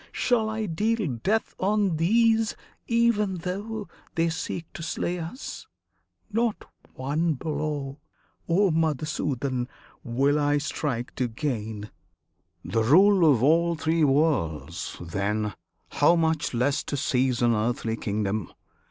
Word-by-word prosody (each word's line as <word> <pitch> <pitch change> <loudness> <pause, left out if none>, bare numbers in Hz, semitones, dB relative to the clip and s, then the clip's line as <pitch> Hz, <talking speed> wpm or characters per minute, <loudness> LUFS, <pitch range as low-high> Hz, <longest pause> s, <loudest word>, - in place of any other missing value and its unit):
Shall 225 -3 +1
I 220 0 -2
deal 205 - 0
death 220 - 0
on 200 -3 +1
these 225 +5 +3 0.3
Even 230 -4 +2
though 200 +4 -4 0.3
they 165 0 +2
seek 165 0 -4
to - - -7
slay 175 +2 -2
us? 170 +11 -7 0.6
Not 230 0 0 0.3
one 150 +5 0
blow, 145 -1 -3 0.5
O 190 +2 +4
Madhusudan! 145 -5 -1 0.4
will 140 +5 +2
I 145 0 +2
strike 140 -4 -3
to 125 - +1
gain 110 -4 -4 0.7
The 115 - 0
rule 180 - +6
of 125 -3 +2
all 170 +4 +4
Three 160 +1 +1
Worlds; 90 - 0
then, 100 +4 -2 0.4
how 150 +4 +4
much 160 -5 0
less 135 +4 +1
To 145 - -3
seize 125 -2 +1
an 120 -1 +4
earthly 115 0 -1
kingdom! 105 -2 -2
155 Hz, 120 wpm, -26 LUFS, 125-185 Hz, 0.7 s, rule